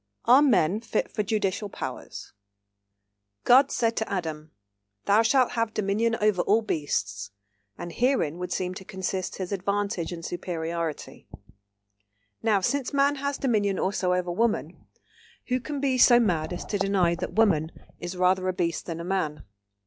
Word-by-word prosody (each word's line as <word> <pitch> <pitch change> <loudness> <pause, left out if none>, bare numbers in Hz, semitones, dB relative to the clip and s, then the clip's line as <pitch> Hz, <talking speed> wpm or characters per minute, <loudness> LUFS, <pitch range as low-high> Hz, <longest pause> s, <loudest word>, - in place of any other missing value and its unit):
CHAPTER 270 +4 +7
XIV 205 0 +2
SEX 220 -1 -3
ANTAGONISM 205 -1 -1
(1) - - -2
MAN'S - - -11
PART - - -44 1.1
"God 265 +3 +6
said 230 -2 0
to 220 - -2
Adam: 160 -5 -4 0.6
Thou 205 +2 +5
shalt 250 +2 +3
have 230 -2 -2
dominion 215 +3 +1
over 210 -4 +2
all 220 +5 +2
beasts; 105 - -2 0.5
and 175 0 -6
herein 235 - +1
would 180 0 -5
seem 180 0 -2
to 190 - -9
consist 190 0 -4
his 185 -1 -5
advantage 200 -3 -2
and 170 -1 -7
superiority. 170 -2 -4 1.1
Now, 210 -3 +2
since 280 +6 -1
man 280 0 +2
has 280 +1 -2
dominion 205 -7 +1
also 185 -1 0
over 180 -1 -1
woman, 225 +5 -1 0.6
who 255 +1 +1
can 290 +3 -5
be 265 -2 0
so 240 0 +7
mad 175 -9 0
as 175 - -5
to 205 - -2
deny 190 -3 +2
that 170 - -5
woman 170 -8 +2 0.3
is 175 +1 -6
rather 185 +1 +2
a 185 - 0
beast 170 -2 -2
than 165 -1 -4
a - - -5
Man? 175 -5 -2
195 Hz, 160 wpm, -26 LUFS, 175-230 Hz, 1.1 s, CHAPTER